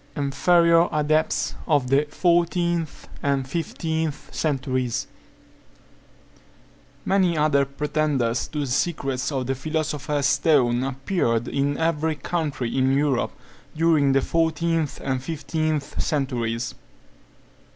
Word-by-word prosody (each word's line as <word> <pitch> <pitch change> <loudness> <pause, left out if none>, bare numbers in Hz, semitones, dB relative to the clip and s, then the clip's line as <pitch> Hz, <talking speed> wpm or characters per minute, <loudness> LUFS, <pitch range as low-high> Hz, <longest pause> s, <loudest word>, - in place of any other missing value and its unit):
INFERIOR 165 +4 +3
ADEPTS 155 +1 +1
OF 145 -5 +2
THE 140 +2 +4
FOURTEENTH 170 -1 0
AND 140 -2 0
FIFTEENTH 160 0 -3
CENTURIES. 130 -5 -1 2.0
Many 185 -4 +2
other 150 -2 +3
pretenders 140 -4 -1
to 150 - -4
the - - -1
secrets 135 -1 -1
of 130 -3 -2
the 135 - 0
philosopher's 150 0 -2
stone 135 -4 +3
appeared 135 - -1
in 140 +1 0
every 160 -1 0
country 145 -5 -3
in 130 0 +2
Europe, 140 -3 +1 0.4
during 155 -4 +3
the 135 - +3
fourteenth 165 -1 0
and 130 -1 -1
fifteenth 155 0 -2
centuries. 120 -6 -1
145 Hz, 100 wpm, -24 LUFS, 135-160 Hz, 2.0 s, THE